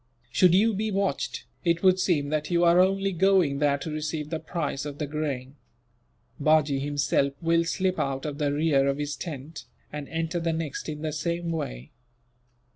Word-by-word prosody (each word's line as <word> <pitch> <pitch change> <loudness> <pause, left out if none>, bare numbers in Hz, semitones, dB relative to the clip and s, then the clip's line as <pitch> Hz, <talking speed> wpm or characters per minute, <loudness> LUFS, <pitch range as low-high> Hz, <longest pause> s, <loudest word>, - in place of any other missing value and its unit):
Should 180 +4 +5
you 220 +4 +4
be 215 +2 -1
watched, 195 -1 -1 0.2
it 170 0 +1
would 185 0 +5
seem 150 -7 +1
that 150 0 -1
you 175 -1 +2
are 170 +1 +5
only 195 +1 +3
going 180 -6 +3
there 145 -1 +3
to 150 +3 -6
receive 155 0 -3
the 160 - -1
price 155 -4 -3
of 145 -1 -6
the 150 - -2
grain. 145 -2 -4 0.8
Bajee 150 -2 +3
himself 140 -1 +1
will 165 0 +2
slip 185 +2 0
out 135 0 -2
of 145 -1 -4
the 145 -1 +1
rear 145 -2 +2
of 140 0 0
his 145 0 -3
tent, 150 -1 -7 0.3
and 150 -1 -6
enter 165 +1 -2
the 165 -1 0
next 160 -1 -4
in 150 0 -6
the 155 -1 -2
same 170 +2 -2
way. 65 - -5
155 Hz, 185 wpm, -26 LUFS, 145-170 Hz, 0.8 s, Should